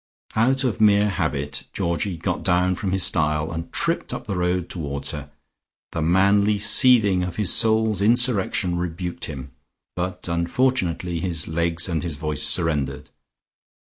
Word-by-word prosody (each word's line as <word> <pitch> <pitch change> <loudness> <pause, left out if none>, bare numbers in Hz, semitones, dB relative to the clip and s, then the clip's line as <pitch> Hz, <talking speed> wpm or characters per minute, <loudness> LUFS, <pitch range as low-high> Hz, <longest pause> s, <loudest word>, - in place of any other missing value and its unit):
Out 130 +5 +2
of 115 -4 -1
mere 105 -1 +4
habit 70 -6 -3
Georgie 85 0 -2
got 90 +2 -3
down 90 0 +2
from 95 +1 -3
his 95 -1 0
stile, 75 -2 0
and 85 0 -6
tripped - - -2
up - - -8
the 100 - -3
road 90 0 -1
towards 70 -5 -4
her. 75 -1 -7 0.6
The 80 - -3
manly 100 +5 +3
seething 105 -3 +5
of 90 -1 -4
his 105 -4 +1
soul's 110 -2 +2
insurrection 105 -6 +1
rebuked 90 0 -4
him, 70 -3 -8 0.4
but 90 0 -4
unfortunately 85 -1 -1
his 85 -2 -2
legs 85 +1 0
and 85 -3 -2
his 85 -4 -4
voice 75 0 -3
surrendered. 75 -2 -1
90 Hz, 145 wpm, -22 LUFS, 80-100 Hz, 0.6 s, seething